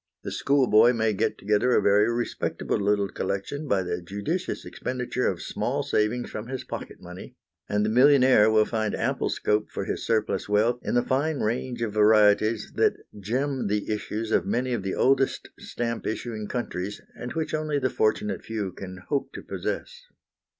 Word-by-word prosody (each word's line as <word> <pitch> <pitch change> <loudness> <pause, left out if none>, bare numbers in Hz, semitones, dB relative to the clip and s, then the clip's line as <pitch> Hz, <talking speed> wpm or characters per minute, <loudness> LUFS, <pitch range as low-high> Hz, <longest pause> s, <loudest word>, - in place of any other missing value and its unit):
The - - -5
schoolboy 125 -4 +4
may 110 -2 +1
get 95 - 0
together 105 +5 +2
a - - +5
very 105 +2 +4
respectable 120 -2 -2
little 100 0 +1
collection 100 +12 -4
by 100 -6 +1
the 90 0 -3
judicious 105 - -3
expenditure 125 0 -2
of 85 -4 -2
small - - -2
savings 110 +3 0
from 110 +1 -6
his 130 0 -5
pocket - - -7
money, 90 +1 -10 0.3
and 105 0 +1
the - - +1
millionaire 130 -2 +6
will 110 -1 +4
find 110 -2 -1
ample - - -1
scope 105 0 0
for - - -4
his - - -3
surplus 110 -2 0
wealth 110 +4 +2
in - - -2
the 120 - +3
fine 145 +3 0
range 120 +2 -2
of 110 -3 -2
varieties 105 +1 +4
that - - +3 0.2
gem 130 +6 -1
the 105 +1 -1
issues 110 +1 -4
of - - +3
many 125 +1 -1
of 115 - -1
the 95 0 -3
oldest 135 0 +2
stamp 115 -1 -4
issuing 110 -1 -4
countries, 105 -5 -4 0.2
and 120 - -6
which 160 -1 -3
only 155 -1 0
the 130 -3 0
fortunate 110 -1 0
few 105 -4 -3
can 95 0 -8
hope 140 -2 -1
to - - -8
possess. 485 +1 -5
110 Hz, 175 wpm, -26 LUFS, 105-125 Hz, 0.3 s, millionaire